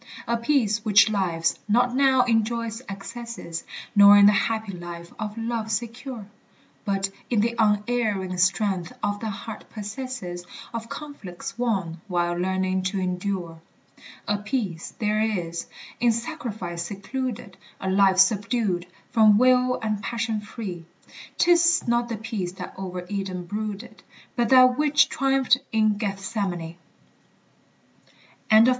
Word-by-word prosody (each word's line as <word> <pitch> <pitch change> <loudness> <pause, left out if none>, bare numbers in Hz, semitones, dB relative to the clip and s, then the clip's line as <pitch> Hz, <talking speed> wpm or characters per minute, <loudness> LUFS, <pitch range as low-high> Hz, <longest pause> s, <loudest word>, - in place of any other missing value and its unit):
A 235 - +1
peace 230 -4 +1
which 215 0 +5
lives 170 -5 0
not 245 +3 +3
now 265 -1 +4
in 225 -2 +3
joy's 230 0 -4
excesses, 200 -3 -6 0.3
Nor 200 0 +9
in 200 - +8
the 205 - +8
happy 220 0 0
life 175 -1 -8
of 215 0 -4
love 225 -1 -2
secure, 235 +1 -4 0.6
But 195 -1 0 0.2
in 230 -4 +2
the 235 +2 +1
unerring 210 -3 +1
strength 190 -1 +1
the 205 +2 -2
heart 215 +2 -7
possesses, 210 -4 -6 0.3
Of 230 0 -5
conflicts 285 -13 -7
won, 190 -9 -1
while 175 -2 0
learning 185 +1 0
to 190 +1 -1
endure. 180 -2 -3 0.7
A 205 0 +1
peace 205 -6 -3
there 215 -1 +1
is, 175 -6 -2 0.3
in 240 0 +4
sacrifice 220 - -4
secluded, 210 +4 -5 0.2
A 190 - -4
life 190 0 +4
subdued, 195 -2 +2 0.2
from 215 -3 +6
will 250 +1 +4
and 215 -2 -1
passion 230 0 -2
free; 205 -5 -7 0.5
'Tis 340 -3 +4
not 235 0 +1
the 230 - -3
peace 210 -5 -4
that - - -8
over 185 -1 -5
Eden 190 -2 -4
brooded, 210 +3 -5 0.3
But 240 -2 +1
that 255 0 +6
which 300 +1 +4
triumphed 270 -2 +2
in 215 -2 +2
Gethsemane. 195 -5 -3 1.7
ANONYMOUS. 220 +2 +7
210 Hz, 130 wpm, -25 LUFS, 190-235 Hz, 1.7 s, Nor